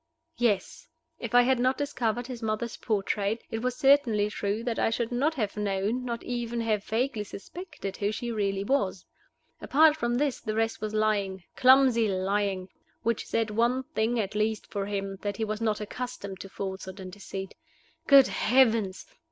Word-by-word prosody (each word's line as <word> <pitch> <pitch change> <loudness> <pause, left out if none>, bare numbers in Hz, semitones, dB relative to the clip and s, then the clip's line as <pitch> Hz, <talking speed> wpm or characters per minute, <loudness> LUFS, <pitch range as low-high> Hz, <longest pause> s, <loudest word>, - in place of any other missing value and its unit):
Yes! 215 -6 0 0.3
If - - -4
I 245 - +8
had 260 0 +2
not 255 +1 +2
discovered 245 -5 -1
his 250 -2 -7
mother's 220 +1 -2
portrait, 210 +1 -1
it 225 - -2
was 250 0 -1
certainly 245 -8 +4
true 205 +2 -2
that 235 -2 -2
I - - +3
should 230 +1 -2
not 285 +6 +1
have 215 -7 -2
known, 210 +4 -1
not 235 -2 -4
even 240 -1 -3
have 215 -3 0
vaguely 230 0 -1
suspected, 210 - -8
who 205 0 0
she 235 +2 -4
really 200 -3 -1
was. 200 -6 0 0.6
Apart 305 +1 +5
from 240 -5 -1
this, 280 0 0
the 215 - -3
rest 225 -1 0
was 215 0 -3
lying, 200 -3 0
clumsy 255 -3 +5
lying, 190 0 -1 0.3
which 230 0 -1
said 225 -1 0
one 240 +4 +1
thing 230 +2 +1
at 205 -2 -2
least 215 0 0
for 200 -1 -4
him, 195 -1 -3
that 205 -1 -3
he 220 - -1
was 215 +1 -4
not 215 -2 +1
accustomed 210 -3 -6
to 195 - -8
falsehood 190 0 -6
and 185 -1 -7
deceit. 195 -1 -7 0.5
Good 275 -2 +9
Heavens! 225 -5 +2
220 Hz, 175 wpm, -28 LUFS, 200-245 Hz, 0.6 s, Good